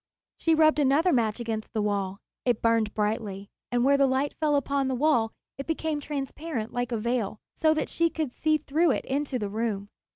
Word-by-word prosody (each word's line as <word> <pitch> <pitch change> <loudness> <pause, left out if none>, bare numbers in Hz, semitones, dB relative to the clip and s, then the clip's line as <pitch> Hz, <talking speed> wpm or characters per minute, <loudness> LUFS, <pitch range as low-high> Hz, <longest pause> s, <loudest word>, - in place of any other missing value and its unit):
She 325 -1 +2
rubbed 310 -1 +4
another 295 +6 +3
match 225 -3 +1
against 225 -2 -4
the 220 - 0
wall. 200 -2 -1 0.3
It 240 -3 0
burned 230 -2 +2
brightly, 210 -2 -2 0.2
and 245 0 +2
where 280 +1 +5
the 275 -1 +4
light 265 +2 0
fell 300 -2 +1
upon 280 0 +1
the 260 - 0
wall 245 -5 +2 0.3
it 275 - -5
became 320 -2 -1
transparent 280 -3 -4
like 245 0 -2
a 230 - 0
veil, 225 -2 -1 0.2
so 315 -1 +3
that 310 - -1
she 335 0 +1
could 310 -6 -3
see 310 -1 +2
through 310 +3 +1
it - - -3
into 275 -1 -1
the 210 -4 -2
room. 210 -2 -2
260 Hz, 200 wpm, -27 LUFS, 220-300 Hz, 0.3 s, where